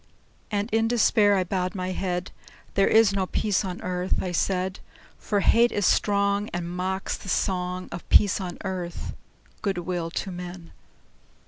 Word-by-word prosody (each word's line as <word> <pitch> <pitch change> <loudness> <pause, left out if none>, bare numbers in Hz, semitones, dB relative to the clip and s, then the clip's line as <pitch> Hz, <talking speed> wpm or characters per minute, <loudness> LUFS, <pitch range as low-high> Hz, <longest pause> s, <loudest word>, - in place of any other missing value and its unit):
And 205 -1 -1
in 225 +1 +2
despair 215 -3 +4
I 190 - +2
bowed 185 +1 -2
my 185 -1 -2
head; 180 -1 -2 0.4
"There 195 - +3
is 220 -2 +5
no 190 -2 0
peace 210 0 0
on 185 -2 -4
earth," 180 0 -1
I 185 - -2
said: 185 +1 0 0.4
"For 205 -2 0
hate 235 +4 +5
is 205 - 0
strong, 200 +1 +2
And 175 -1 -3
mocks 190 +1 -2
the 195 - -9
song 180 -1 -1
Of 170 - -8
peace 200 -1 +5
on 180 -2 -5
earth, 180 -3 -4 0.5
good 195 -3 -1
will 175 -1 -2
to 190 +3 -4
men!" 175 -1 -8
190 Hz, 160 wpm, -26 LUFS, 180-200 Hz, 0.5 s, is